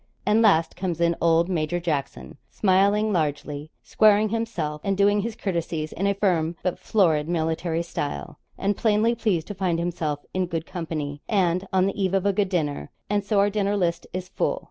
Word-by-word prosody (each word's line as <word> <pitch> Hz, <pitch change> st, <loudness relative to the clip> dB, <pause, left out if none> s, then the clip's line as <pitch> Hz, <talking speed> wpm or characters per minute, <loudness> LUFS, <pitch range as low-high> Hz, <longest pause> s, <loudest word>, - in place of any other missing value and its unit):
And 210 Hz, +3 st, +3 dB
last 165 Hz, -7 st, +3 dB
comes 175 Hz, -3 st, -3 dB
in 170 Hz, 0 st, +2 dB
old 165 Hz, 0 st, +3 dB
Major 175 Hz, -1 st, -1 dB
Jackson, 150 Hz, -4 st, -4 dB
smiling 205 Hz, +2 st, +2 dB
largely, 150 Hz, -2 st, -2 dB
squaring 215 Hz, 0 st, +4 dB
himself, 200 Hz, -10 st, -3 dB
and 195 Hz, -1 st, 0 dB
doing 205 Hz, +1 st, +3 dB
his 225 Hz, +1 st, -4 dB
courtesies 170 Hz, -6 st, -3 dB
in 195 Hz, +3 st, -1 dB
a 200 Hz, -, +1 dB
firm 175 Hz, -5 st, +1 dB
but 180 Hz, -, -1 dB
florid 165 Hz, -7 st, +2 dB
military 165 Hz, 0 st, -1 dB
style, 145 Hz, -, -5 dB, 0.2 s
and 200 Hz, +1 st, 0 dB
plainly 220 Hz, +2 st, +2 dB
pleased 210 Hz, -8 st, 0 dB
to -, -, -3 dB
find 185 Hz, -3 st, 0 dB
himself 165 Hz, -4 st, -3 dB
in 185 Hz, -1 st, 0 dB
good 165 Hz, -2 st, -3 dB
company 155 Hz, -4 st, -5 dB
and 185 Hz, -2 st, +1 dB
on 185 Hz, -1 st, +3 dB
the 195 Hz, +1 st, -2 dB
eve 190 Hz, 0 st, +1 dB
of 195 Hz, 0 st, 0 dB
a 200 Hz, -, +3 dB
good 195 Hz, -1 st, +1 dB
dinner. 150 Hz, -6 st, -2 dB, 0.2 s
And 205 Hz, -1 st, +1 dB
so 205 Hz, +1 st, 0 dB
our 200 Hz, +1 st, +4 dB
dinner 205 Hz, 0 st, 0 dB
list 170 Hz, -2 st, -1 dB
is 185 Hz, 0 st, -5 dB
full. -, -, -1 dB
180 Hz, 190 wpm, -24 LUFS, 160-200 Hz, 0.2 s, squaring